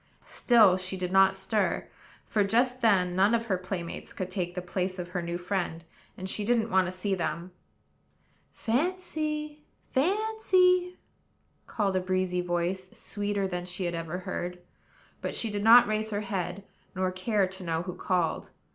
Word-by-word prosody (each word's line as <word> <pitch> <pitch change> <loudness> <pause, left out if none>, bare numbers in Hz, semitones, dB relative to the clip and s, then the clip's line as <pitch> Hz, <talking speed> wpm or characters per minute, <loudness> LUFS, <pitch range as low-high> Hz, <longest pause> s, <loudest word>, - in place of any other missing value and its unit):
Still 215 -7 +5
she 185 0 -4
did 180 -1 -3
not 195 0 +5
stir; 205 +1 0 0.4
for, 210 -2 +1
just 245 +5 +1
then, 185 -6 +3
none 200 +5 +4
of 230 0 -1
her 195 -5 0
playmates 185 -2 -5
could 185 -1 -5
take 180 -2 -3
the - - -1
place 185 +1 -2
of 175 -1 -5
her 180 0 -2
new 170 0 -3
friend, 175 -2 -3 0.3
and 185 - -5
she 205 +2 -1
didn't 230 0 +1
want 190 -1 +4
to - - -3
see 185 +2 -2
them. 170 0 -3 1.0
"Fancy! 305 +2 -2 0.3
Fancy!" 365 +1 +2 0.7
called 200 -4 0
a - - +3
breezy 185 -1 0
voice, 175 +2 -2
sweeter 205 -1 -2
than 180 -1 -3
any 175 - -8
she 185 +1 -3
had 175 - -1
ever 165 0 -4
heard. 180 -1 -4 0.6
But - - -3
she 225 - 0
did 205 0 -2
not 235 +2 +9
raise 215 0 -1
her 205 -1 -2
head, 195 -2 -3 0.3
nor 185 -1 0
care 195 +2 +1
to 190 0 -8
know 165 -1 -1
who 180 0 -5
called. 180 -2 -1
190 Hz, 170 wpm, -28 LUFS, 180-225 Hz, 1.0 s, not